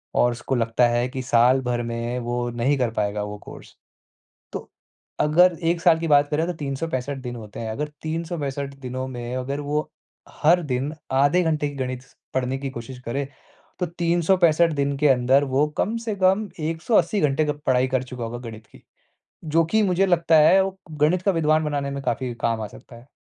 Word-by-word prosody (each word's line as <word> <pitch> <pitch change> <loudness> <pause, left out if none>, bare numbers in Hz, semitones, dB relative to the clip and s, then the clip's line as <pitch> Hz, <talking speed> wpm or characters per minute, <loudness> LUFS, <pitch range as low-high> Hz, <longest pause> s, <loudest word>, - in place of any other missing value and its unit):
और 120 - +4
उसको 120 +3 -3
लगता 115 +1 +2
है 120 +1 +1
कि 130 -1 -5
सालभर 125 0 +3
में 115 +1 -3
वो 120 0 -2
नहीं 120 +4 +1
कर 125 -3 0
पाएगा 105 -1 -1
वो 105 0 -6
कोर्स। - - -12 0.8
तो - - -7 0.5
अगर 170 +3 +4
1 165 +1 +1
साल 165 -2 +5
की 165 - -2
बात 145 -1 +5
करें 160 +3 +1
तो 180 - -2
365 140 -2 -3
दिन 120 -1 -5
होते 110 -1 -9
हैं। 110 -1 -4
अगर 150 +6 -3
365 155 -4 -3
दिनों 130 0 -4
में 120 0 -5
अगर 135 +3 -3
वो 150 +1 -2 0.5
हर 170 +3 +5
दिन 135 +4 -1 0.2
आधे 145 +7 +3
घंटे 155 -3 0
की 145 - -8
गणित 130 -1 -3
स - - -24 0.2
पढ़ने 130 +1 -1
की 135 -1 -4
कोशिश 125 +1 -8
करे, 140 +4 -2 0.6
तो 180 - +1
365 170 -1 +2
दिन 140 -1 -1
के 150 0 +4
अंदर 130 +2 +4
वो 135 +2 +2
कम 225 +3 0
से 215 - -1
कम 195 +2 +2
180 165 +5 +1
घंटे 150 +1 +2
गप 150 0 -3
पढाई 130 0 +3
कर 130 -1 0
चूका 125 -2 -6
होगा 120 +1 -5
गणित 110 0 -12
की। - - -19 0.6
जो 165 +2 +3
कि 215 +7 +2
मुझे 190 0 +2
लगता 170 -3 +3
है, 185 +6 +6
वो 190 0 -4 0.2
गणित 170 +4 +3
का 195 - +2
विद्वान 155 -2 +2
बनाने 145 -2 -2
में 140 0 -4
काफ़ी 130 -3 -2
काम 115 -1 0
आ 105 - -3
सकता 120 - -14
है। 120 +3 -15
140 Hz, 195 wpm, -23 LUFS, 125-165 Hz, 0.8 s, है